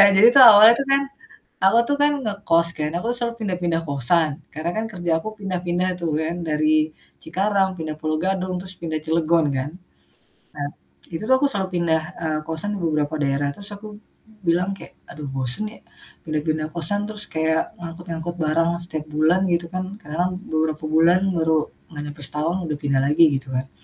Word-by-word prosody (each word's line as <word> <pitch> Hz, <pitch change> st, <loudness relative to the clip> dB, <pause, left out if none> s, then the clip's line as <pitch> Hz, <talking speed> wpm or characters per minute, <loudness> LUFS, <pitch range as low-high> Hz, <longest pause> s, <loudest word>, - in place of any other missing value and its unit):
jadi 215 Hz, +4 st, +8 dB
tuh 270 Hz, -, +9 dB
awalnya 215 Hz, +2 st, +9 dB
tuh -, -, -3 dB
kan, 275 Hz, 0 st, +4 dB, 0.6 s
aku 195 Hz, +4 st, +5 dB
tuh 285 Hz, -, +1 dB
kan 295 Hz, 0 st, +4 dB
ngekos 175 Hz, -6 st, +1 dB
kan, 150 Hz, 0 st, -1 dB
aku 205 Hz, -, -4 dB
selalu 235 Hz, -1 st, -2 dB
pindah-pindah 175 Hz, -5 st, -1 dB
kosan, 150 Hz, +4 st, +2 dB, 0.2 s
karena 155 Hz, +3 st, -3 dB
kan 220 Hz, -, -1 dB
kerja 175 Hz, -3 st, -3 dB
aku 165 Hz, -, -8 dB
pindah-pindah 180 Hz, -2 st, -2 dB
tuh 170 Hz, -2 st, -2 dB
kan. 165 Hz, +2 st, -2 dB
Dari 155 Hz, 0 st, +1 dB, 0.6 s
Cikarang, 195 Hz, +3 st, +1 dB
pindah 155 Hz, -1 st, -4 dB
Pulo 155 Hz, 0 st, -1 dB
Gadung, 185 Hz, -1 st, -1 dB
terus 185 Hz, 0 st, -2 dB
pindah 160 Hz, -2 st, -4 dB
Cilegon 165 Hz, 0 st, +2 dB
kan. 130 Hz, +2 st, -2 dB, 0.9 s
Nah, 145 Hz, -1 st, -3 dB, 0.5 s
itu 165 Hz, -, -4 dB
tuh 260 Hz, -, +5 dB
aku 285 Hz, -, +3 dB
selalu 195 Hz, -3 st, -2 dB
pindah, 165 Hz, -2 st, +1 dB, 0.2 s
eee, 155 Hz, -1 st, -1 dB
kosan 160 Hz, +5 st, -3 dB
ke -, -, -5 dB
beberapa 150 Hz, -1 st, 0 dB
daerah, 140 Hz, +1 st, 0 dB
terus 200 Hz, -, -3 dB
aku 210 Hz, +1 st, -10 dB, 0.6 s
bilang 175 Hz, +3 st, +2 dB
kayak, -, -, -13 dB, 0.2 s
"Aduh 150 Hz, -1 st, -8 dB
bosen 135 Hz, -, -2 dB
ya, -, -, -16 dB, 0.5 s
udah 155 Hz, -1 st, -1 dB
pindah 155 Hz, 0 st, 0 dB
kosan 175 Hz, +5 st, +3 dB
terus 210 Hz, -1 st, +1 dB
kayak 160 Hz, 0 st, 0 dB
ngangkut-ngangkut 170 Hz, 0 st, -6 dB
barang 165 Hz, +2 st, +2 dB
setiap 155 Hz, -3 st, -4 dB
bulan," 155 Hz, +4 st, +3 dB
gitu 170 Hz, 0 st, +1 dB
kan. 185 Hz, -, -2 dB, 0.2 s
Karena 150 Hz, -5 st, -8 dB
lam -, -, -6 dB, 0.2 s
beberapa 155 Hz, -1 st, -1 dB
bulan 165 Hz, +3 st, +4 dB, 0.2 s
baru 160 Hz, -1 st, +1 dB, 0.4 s
gak 150 Hz, -2 st, -7 dB
nyampe 145 Hz, 0 st, -9 dB
setahun 155 Hz, +5 st, 0 dB
udah 150 Hz, -2 st, -3 dB
pindah 140 Hz, -2 st, +1 dB
lagi 150 Hz, +4 st, +4 dB
gitu 135 Hz, 0 st, -5 dB
kan. 130 Hz, +1 st, -2 dB
165 Hz, 180 wpm, -22 LUFS, 155-185 Hz, 0.9 s, tuh